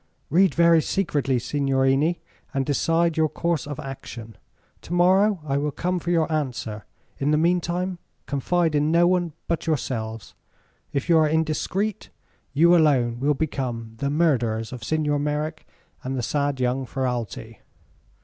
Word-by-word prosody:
"Read 185 +4 +4
very 170 -1 +5
secretly, 145 -8 0
signorini, 135 +4 +1 0.3
and 135 -1 +1
decide 165 +3 +1
your 160 -1 +3
course 170 -4 -1
of 145 0 -6
action. 125 -5 -8 0.5
To 170 - -7
morrow 190 +3 +4
I 140 -2 0
will 145 +1 0
come 180 +5 -2
for 170 - -5
your 165 -2 +2
answer. 125 -8 -3 0.3
In 140 - 0
the 150 - +3
meantime, 175 +2 0 0.3
confide 160 +4 0
in 150 +1 +2
no 170 +1 +5
one 175 -2 +1
but 170 0 -2
yourselves. 115 -8 -3 0.6
If 140 -2 -2
you 165 -2 +5
are 155 -1 +3
indiscreet, 160 +6 -1 0.4
you 170 +4 +5
alone 130 -8 +3
will 145 +3 +2
become 125 -6 -3
the 140 +2 -1
murderers 120 -8 +1
of 120 -3 -8
Signor 150 +2 0
Merrick 150 +2 -3 0.4
and 130 +1 -3
the 125 - -2
sad 140 +1 -1
young 125 +1 0
Ferralti." 120 -4 -4
150 Hz, 150 wpm, -24 LUFS, 130-170 Hz, 0.6 s, very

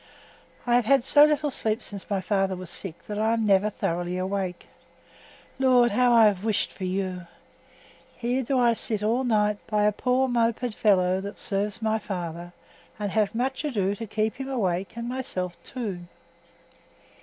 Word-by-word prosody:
I 240 - +1
have 245 - +1
had 270 +1 +4
so 290 +3 +6
little 300 -1 0
sleep 220 -2 -1
since 200 -2 -7
my 200 -2 0
father 195 -1 0
was 180 -1 -8
sick 175 -5 -3
that 210 0 -4
I 220 +1 +2
am 225 -1 0
never 200 0 +3
thoroughly 175 -2 -2
awake. 185 -1 -3 0.9
Lord, 250 -3 +4
how 245 +3 +3
I 230 -2 +7
have 200 -2 +2
wished 220 -2 0
for 190 - -6
you! 185 -1 -3 0.9
Here 245 +2 -1
do 265 +2 -1
I 240 -2 +4
sit 215 -2 -1
all 235 +5 +1
night 210 -4 +1
by 210 -1 +1
a 210 - +4
poor 255 +4 +1
moped 235 -1 0
fellow 190 -3 +2
that 200 +1 -7
serves 205 +2 -1
my 220 0 +1
father, 175 -4 -6 0.5
and 205 -2 -3
have 215 0 0
much 265 +4 -1
ado 205 -10 0
to 225 +2 -7
keep 215 +3 -1
him 270 0 -5
awake 190 -8 -1
and 235 0 -4
myself 185 -9 -4
too. 220 -8 -5
210 Hz, 175 wpm, -26 LUFS, 190-240 Hz, 0.9 s, I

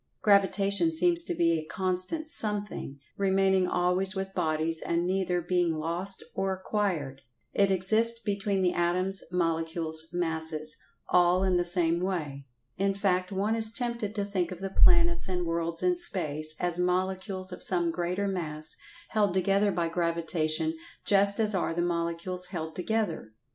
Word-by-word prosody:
Gravitation 200 - +3
seems 340 +1 +2
to 345 +1 -4
be 165 - +2
a - - -6
constant 185 - 0
something, 210 - -2 0.2
remaining 190 -1 +2
always 180 +3 +1
with 195 0 -4
bodies 160 -2 0
and 170 +1 -1
neither 180 -1 0
being 175 0 +1
lost 170 +5 -2
or 195 0 -1
acquired. 185 -8 -2 0.3
It 200 -1 +3
exists 220 +5 +2
between 200 -3 -1
the 180 - +2
Atoms, 185 +3 0
Molecules, 165 -2 -1
Masses—all 165 +2 0
in 185 -2 +2
the 175 - +2
same 175 -1 +3
way. 150 -7 -4 0.3
In 195 +1 0
fact, 185 -2 0
one 200 +3 0
is 220 -1 +4
tempted 235 -3 -2
to 205 -1 -1
think 190 -3 -2
of 180 - -7
the 195 0 -5
planets 170 -2 +4
and 180 -1 -2
worlds 165 0 -2
in 360 -1 +3
space, 155 - 0
as 175 -1 0
Molecules 185 +1 -1
of 180 - -8
some 175 -2 +3
greater 180 +4 -2
Mass 155 -5 0 0.3
held 205 -4 +1
together 195 +2 +2
by 170 -3 -1
Gravitation 170 - -1 0.3
just 200 +1 +3
as 215 -1 +2
are 175 -3 -1
the 175 - 0
Molecules 170 +1 -2
held 160 -4 -5
together. 205 - -2
180 Hz, 150 wpm, -28 LUFS, 170-200 Hz, 0.3 s, is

